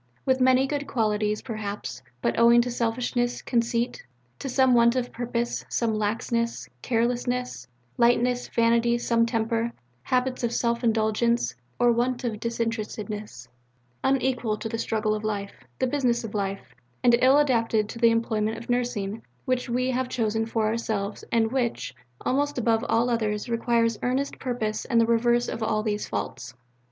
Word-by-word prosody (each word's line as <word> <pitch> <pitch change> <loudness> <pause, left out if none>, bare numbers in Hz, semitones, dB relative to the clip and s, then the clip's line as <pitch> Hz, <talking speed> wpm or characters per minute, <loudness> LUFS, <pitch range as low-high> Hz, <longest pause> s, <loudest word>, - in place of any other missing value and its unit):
with 260 -1 +2
many 260 +1 +5
good 285 0 -3
qualities, 215 -3 0
perhaps, 205 - -5 0.2
but 120 - +2
owing 235 +1 +7
to 245 +1 +1
selfishness, 245 +1 -1
conceit, 235 0 0 0.4
to 270 - -4
some 260 0 +4
want 235 0 +5
of 250 -1 -1
purpose, 240 0 -2
some 230 -2 0
laxness, 230 +2 -1
carelessness, 245 - -1 0.3
lightness, 245 +1 +3
vanity, 235 +1 +2
some 230 -1 +2
temper, 230 0 0 0.3
habits 255 - 0
of 235 - +1
self 235 0 0
indulgence, 220 - +1 0.2
or 240 0 +4
want 245 +2 0
of 225 -4 -2
disinterestedness, 215 - -4 0.6
unequal 250 -5 +1
to 225 - -5
the 225 +1 -4
struggle 215 -1 0
of 215 0 -3
life, 205 -2 -3 0.2
the - - +1
business 250 -3 +1
of 225 - -6
life, 195 -1 -3 0.3
and 240 -1 +6
ill 265 +2 +6
adapted 230 -7 +2
to 230 - -8
the 230 -1 +6
employment 225 -1 0
of 235 +2 -5
Nursing 235 -4 -1 0.2
which 255 -1 -1
we 255 +2 0
have 255 0 -1
chosen 225 -2 0
for 225 -1 0
ourselves 215 -2 -2
and 225 -1 +2
which, 250 -3 -1 0.3
almost 290 +2 0
above 225 -2 +2
all 230 +2 +3
others, 215 -3 -1
requires 230 -1 +1
earnest 260 +3 -1
purpose 230 -4 -2
and 235 - +2
the 230 - +5
reverse 240 +1 +2
of 230 - -4
all 215 -1 0
these 210 -1 -2
faults. 100 +2 -5
235 Hz, 155 wpm, -26 LUFS, 220-245 Hz, 0.6 s, owing